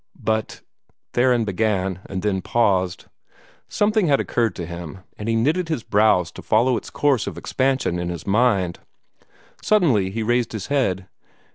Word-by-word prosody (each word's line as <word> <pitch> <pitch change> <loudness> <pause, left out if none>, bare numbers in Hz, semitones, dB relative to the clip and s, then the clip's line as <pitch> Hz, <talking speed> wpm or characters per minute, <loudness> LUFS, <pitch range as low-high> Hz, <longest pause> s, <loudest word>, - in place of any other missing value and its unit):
"But 110 -1 -2 0.3
" - - -43
Theron 120 -2 +3
began, 95 -2 -1
and 95 -1 -5
then 100 -3 0
paused. 95 -5 +1 0.6
Something 210 -2 +2
had 140 -2 +3
occurred 115 -2 0
to 85 - -5
him, 85 +2 -8
and 105 +2 -5
he 115 - +1
knitted 160 +9 +1
his 155 -8 -2
brows 100 -4 +3
to - - -10
follow 120 +3 +2
its 110 - -5
course 140 -6 +1
of - - -5
expansion 130 -9 0
in 85 0 -3
his 85 -3 -6
mind. 100 -5 +1 0.8
Suddenly 140 - +3
he 110 +3 -3
raised 120 +1 0
his 105 -4 -4
head. 95 -9 0
110 Hz, 160 wpm, -22 LUFS, 95-125 Hz, 0.8 s, Theron